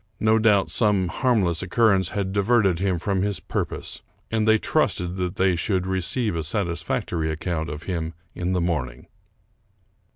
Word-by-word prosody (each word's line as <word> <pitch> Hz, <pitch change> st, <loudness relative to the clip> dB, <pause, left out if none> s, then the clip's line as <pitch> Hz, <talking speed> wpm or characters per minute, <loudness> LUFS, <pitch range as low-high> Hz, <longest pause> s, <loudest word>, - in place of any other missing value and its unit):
No 110 Hz, +1 st, +3 dB
doubt 105 Hz, -3 st, +3 dB
some 100 Hz, -6 st, +2 dB
harmless 100 Hz, -, +1 dB
occurrence 95 Hz, -1 st, +2 dB
had 95 Hz, -2 st, -2 dB
diverted 100 Hz, -3 st, +2 dB
him 95 Hz, -2 st, +1 dB
from 95 Hz, +2 st, -1 dB
his 100 Hz, -1 st, -1 dB
purpose; -, -, -4 dB, 0.3 s
and 110 Hz, -1 st, +1 dB
they 110 Hz, 0 st, +6 dB
trusted 90 Hz, -4 st, 0 dB
that 90 Hz, -1 st, -2 dB
they 95 Hz, -1 st, +2 dB
should 95 Hz, +1 st, 0 dB
receive 95 Hz, +3 st, -1 dB
a 80 Hz, -, -1 dB
satisfactory 85 Hz, -2 st, -2 dB
account 80 Hz, +1 st, -3 dB
of 75 Hz, +1 st, -6 dB
him 85 Hz, -3 st, -3 dB, 0.2 s
in 90 Hz, +1 st, -2 dB
the 90 Hz, -, +1 dB
morning. 75 Hz, -8 st, -2 dB
95 Hz, 155 wpm, -24 LUFS, 85-105 Hz, 0.3 s, they